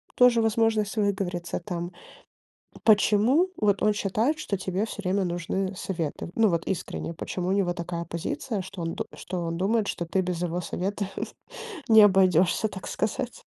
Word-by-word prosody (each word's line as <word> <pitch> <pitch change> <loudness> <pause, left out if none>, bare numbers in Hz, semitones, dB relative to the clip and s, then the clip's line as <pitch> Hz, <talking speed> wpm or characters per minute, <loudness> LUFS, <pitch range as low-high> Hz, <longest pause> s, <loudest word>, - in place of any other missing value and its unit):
тоже 245 -2 +6
возможность 225 -2 +1
выговориться, 190 -4 -1
там. 175 0 -4 0.9
Почему 220 - +4
вот 205 -3 +2
он 215 - +4
считает, 220 +9 0
что 215 -9 -2
тебе 185 0 -3
всё 205 - -7
время 190 +1 +1
нужны 180 +2 -2
советы? 170 -3 -4
Ну, 225 -1 +5
вот 170 -2 -1
искренне, 170 -2 -3
почему 180 +2 -4
у - - +2
него 195 -3 +2
такая 170 0 -4
позиция, 170 +4 -3
что 185 -1 -7
он 165 0 -2
д - - -3
что 180 -1 -4
он 165 0 -2
думает, 205 +3 +1
что 170 - -2
ты 190 +3 +1
без 180 -1 -3
его 175 0 -1
совета 200 +4 -2 0.8
не 220 -1 +8
обойдешься, 190 +1 +4
так 190 -2 -8
сказать. - - -3
190 Hz, 165 wpm, -26 LUFS, 175-210 Hz, 0.9 s, не